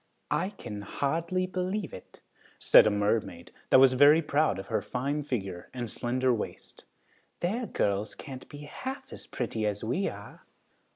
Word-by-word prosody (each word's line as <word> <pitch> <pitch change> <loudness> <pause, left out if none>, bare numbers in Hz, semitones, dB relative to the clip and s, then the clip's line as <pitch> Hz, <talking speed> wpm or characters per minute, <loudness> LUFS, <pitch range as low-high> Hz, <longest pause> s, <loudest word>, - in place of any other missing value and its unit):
"I 190 - +1
can 105 - -8
hardly 165 - -1
believe 185 +1 -3
it," - - -12 0.4
said - - +7
a - - +5
mermaid, 105 -4 -1 0.2
that - - +7
was 130 -1 +7
very 145 +5 +6
proud 150 -8 +1
of 95 - -6
her - - -1
fine 140 +4 -2
figure 100 -11 -4
and 120 -3 -4
slender 130 +1 0
waist. 110 - -6 0.6
"Their 220 +7 -1
girls 100 +1 -1
can't 130 -2 -9
be 145 -1 -10
half 265 - -7
as - - -9
pretty 115 -3 -3
as 105 -1 -3
we 130 - 0
are." - - -11
130 Hz, 160 wpm, -29 LUFS, 110-165 Hz, 0.6 s, said